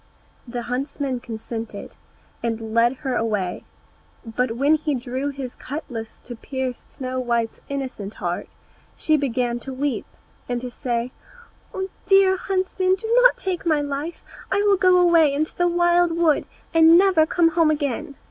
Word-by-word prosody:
The 240 0 -4
huntsman 260 +1 -3
consented, 230 -1 -7 0.5
and 225 -1 -3
led 230 +2 +4
her 260 -2 0
away; 205 -6 -1 0.6
but 230 +1 -1
when 280 +6 +3
he 305 -2 0
drew 255 +3 -3
his 270 -3 -6
cutlass 250 -6 -7
to 240 - -8
pierce 260 +1 -4
Snow 255 -1 -6
white's 235 -2 -1
innocent 260 -7 -5
heart, - - -3 0.5
she 310 - +2
began 245 -4 0
to 270 - -7
weep, 270 +1 -2 0.4
and 245 -1 -1
to 250 0 -6
say, 240 0 -2 0.6
"Oh, 380 0 -3 0.2
dear 390 -1 +5
huntsman, 375 0 0
do 445 +3 -7
not - - +6
take 370 -3 -3
my 310 -3 +2
life; 285 +3 -4 0.3
I 405 +1 +2
will 405 -1 +5
go 365 -1 +5
away 340 -4 +5
into 300 +3 -2
the 350 - +2
wild 345 0 +3
wood, 330 -3 +2 0.3
and 330 0 +7
never 365 -4 +4
come 335 0 +3
home 330 -1 +3
again." 290 0 -2
280 Hz, 155 wpm, -23 LUFS, 245-335 Hz, 0.6 s, and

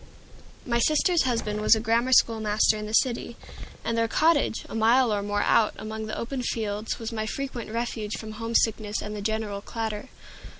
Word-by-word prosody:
My 235 -2 +1
sister's 310 +5 +3
husband 215 -4 -1
was 215 - +6
a - - -1
grammar 230 +3 +1
school 230 -3 +5
master 215 0 +2
in 210 0 -5
the 215 - -7
city, 235 0 +1 0.5
and 230 - 0
their 230 0 +1
cottage, 300 -1 +2
a - - -10
mile 225 +1 +3
or 205 - 0
more 205 0 -1
out, 215 - +3
among 220 0 -6
the 215 - -4
open 250 +2 -3
fields, 215 -3 -2
was 225 0 -5
my 220 -1 -3
frequent 260 -3 -5
refuge 225 -2 -3
from 220 -1 -7
homesickness 220 -1 0
and 210 0 -5
the 205 - -5
general 215 -1 -2
clatter. 220 +2 -5
225 Hz, 185 wpm, -26 LUFS, 215-235 Hz, 0.5 s, was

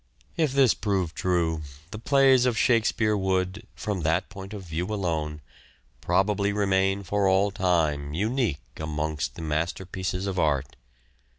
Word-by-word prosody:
If 155 -5 +1
this 135 -4 +5
proved 95 -5 -1
true, 85 -3 0 0.3
the 105 - -6
plays 135 0 +4
of 120 -2 0
Shakespeare 115 -2 +2
would, 95 +2 -1
from 105 -4 -3
that 85 +4 0
point 95 -1 -9
of 105 -3 -7
view 85 +1 -3
alone, 80 -7 -2 0.6
probably 100 +1 +1
remain 95 -1 +1
for 100 +1 +1
all 95 +2 +3
time 80 -7 0
unique 105 - -1
amongst 75 -3 -3
the 85 - -7
masterpieces 90 +4 -2
of 95 -2 -2
art. 70 -4 0
95 Hz, 135 wpm, -26 LUFS, 80-105 Hz, 0.6 s, this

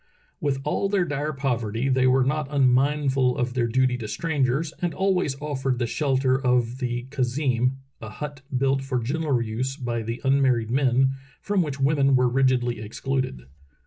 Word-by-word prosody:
With 140 -2 -1
all 175 +7 0
their 195 -3 +2
dire 145 0 -2
poverty 125 -4 -2
they 130 -1 +3
were 130 +1 +4
not 150 +2 -1
unmindful 135 -1 +2
of 125 0 -1
their 120 -2 +1
duty 125 +1 +1
to 110 - -5
strangers 145 +5 -1
and 175 -2 -1
always 185 -8 0
offered 135 -3 -2
the 120 - 0
shelter 130 0 +1
of 125 0 +1
the 120 -2 -2
khazeem 125 -1 0 0.3
(a 110 - -7
hut 145 +4 -7 0.2
built 135 +1 +1
for 135 -1 -2
general 135 +1 0
use 120 +4 -3
by 120 -4 -3
the 115 +2 -4
un 135 +1 +3
married 120 -4 +1
men, 130 0 +3 0.3
from 200 -2 0
which 145 -5 -3
women 135 -1 +3
are 125 - +3
rigidly 125 -2 +1
excluded). 130 - -3
130 Hz, 170 wpm, -24 LUFS, 125-140 Hz, 0.3 s, were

